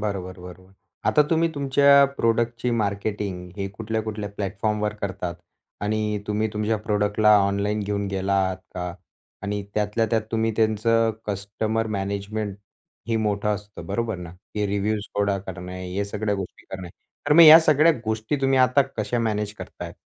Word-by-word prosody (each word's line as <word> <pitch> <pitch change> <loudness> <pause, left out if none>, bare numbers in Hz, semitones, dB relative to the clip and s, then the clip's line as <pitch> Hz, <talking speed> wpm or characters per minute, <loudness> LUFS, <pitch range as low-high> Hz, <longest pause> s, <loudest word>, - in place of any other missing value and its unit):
बरोबर-बरोबर. 95 -2 -6 0.4
आता 150 - +5
तुम्ही 165 0 +3
तुमच्या 140 0 +5
प्रॉडक्टची 115 +1 +1
मार्केटिंग 100 -4 -2
हे 100 -1 -2
कुठल्या-कुठल्या 110 0 -4
प्लॅटफॉर्मवर 105 +1 -1
करतात? 95 -3 -3 0.5
आणि 105 0 -1
तुम्ही 105 +1 0
तुमच्या 105 +1 0
प्रॉडक्टला 105 0 +3
ऑनलाईन 100 +2 -1
घेऊन 100 0 -2
गेला 95 0 -1
आहात 95 0 -2 0.2
का? 90 -1 -4 0.5
आणि 100 0 -2
त्यातल्या 105 +2 +1
त्यात 110 -2 +2
तुम्ही 115 0 +1
त्यांचं 115 +1 +2 0.2
कस्टमर 105 +2 -2
मॅनेजमेंट 100 +1 -3 0.5
हे 115 - +1
मोठं 105 -1 0
असतं, 105 0 -9
बरोबर 115 -4 -2
ना? 90 -2 -8 0.2
की 105 -1 0
रिव्ह्यूज 105 +1 -1
गोळा 100 -1 +1
करणे, 90 -1 -7
हे 100 +1 0
सगळ्या 105 +1 -2
गोष्टी 95 -2 -7
करणे. 95 -2 -6 0.4
तर 145 - +4
मग 170 +2 +9
या 160 +1 +11
सगळ्या 155 +1 +5
गोष्टी 110 +5 -1
तुम्ही 135 0 +3
आता 130 +2 +5
कशा 115 +3 -1
मॅनेज 105 -2 -1
करताय? - - -8
105 Hz, 145 wpm, -24 LUFS, 100-115 Hz, 0.5 s, या